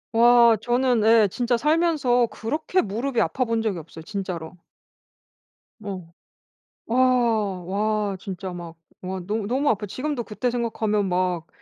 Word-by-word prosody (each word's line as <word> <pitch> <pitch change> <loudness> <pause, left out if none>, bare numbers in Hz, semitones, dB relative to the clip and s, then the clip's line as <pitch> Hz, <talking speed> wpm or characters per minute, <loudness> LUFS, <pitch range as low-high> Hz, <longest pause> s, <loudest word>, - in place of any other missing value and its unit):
와 235 0 +6
저는 245 -1 +1
예 225 -2 +6
진짜 240 +5 0
살면서 300 -4 +2
그렇게 305 - -1
무릎이 235 +5 -2
아파본 230 -3 0
적이 205 -6 -1
없어요 160 0 -11
진짜로. 185 -5 -5 1.2
뭐 185 -5 -8 0.7
와 230 -6 +2 0.5
와 195 - -5
진짜 190 -1 -6
막 170 -1 -8 0.3
와 190 +1 -4
너 210 +2 -2
너무 270 +5 +1
아파요. 210 -1 0
지금도 255 +4 -3
그때 240 +3 -2
생각하면 220 -4 -1
막 180 -2 -1
225 Hz, 255 characters per minute, -24 LUFS, 190-245 Hz, 1.2 s, 와